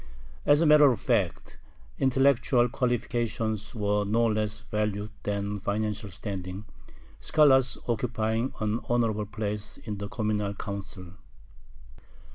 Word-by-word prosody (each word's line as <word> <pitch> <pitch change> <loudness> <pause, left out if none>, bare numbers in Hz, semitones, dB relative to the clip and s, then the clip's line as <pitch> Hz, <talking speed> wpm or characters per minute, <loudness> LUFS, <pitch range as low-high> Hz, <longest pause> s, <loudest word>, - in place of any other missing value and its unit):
As 145 +2 +6
a - - +4
matter 150 -2 +7
of 120 - -2
fact, - - -1 0.4
intellectual 130 -2 +3
qualifications 115 -3 -2
were 105 -1 +1
no 115 +3 +2
less 110 -1 -1
valued 105 0 -2
than 100 0 -2
financial 105 +1 -2
standing, 95 +1 -6 0.5
scholars 135 -4 +4
occupying 115 0 -1
an 110 +1 0
honorable 110 -3 +1
place 105 -1 -4
in 105 -3 -6
the 100 - -4
communal 105 -3 -1
council. 100 -3 -7
110 Hz, 110 wpm, -27 LUFS, 105-120 Hz, 0.5 s, matter